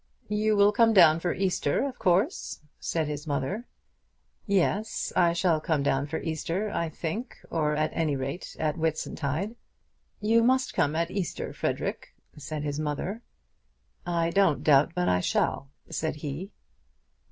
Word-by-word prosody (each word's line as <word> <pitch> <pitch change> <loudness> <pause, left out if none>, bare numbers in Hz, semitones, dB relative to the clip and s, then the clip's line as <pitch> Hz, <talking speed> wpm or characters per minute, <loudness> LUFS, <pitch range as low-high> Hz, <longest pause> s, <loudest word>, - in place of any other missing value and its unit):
"You 210 +1 +2
will 200 0 +6
come 225 +1 +4
down 165 -5 +7
for 175 +1 -1
Easter, 185 - 0
of 260 - -8
course," 190 - +1 0.2
said 160 -2 -1
his 150 +1 -5
mother. 145 - -2 0.8
"Yes; 200 +2 0
I 170 -1 +5
shall 170 -3 +2
come 155 -3 0
down 140 0 +1
for 160 +2 -3
Easter, 170 +6 -2
I 170 -1 -1
think, 175 - -5
or 150 -2 +1
at 155 +1 0
any 155 -3 0
rate 135 +6 -5
at 155 +1 0
Whitsuntide." 160 - -2 0.7
"You 225 +2 +3
must 260 +2 +2
come 145 +2 +1
at 170 +1 0
Easter, 190 -6 -3
Frederic," - - -3 0.2
said 150 0 -5
his 145 0 -2
mother. 155 +9 -3 0.8
"I 170 -1 0
don't 195 -5 +3
doubt 150 +2 +5
but 180 0 +1
I 90 - +3
shall," 135 +8 0 0.2
said 160 -1 -2
he. 150 +6 -6
165 Hz, 150 wpm, -27 LUFS, 150-200 Hz, 0.8 s, down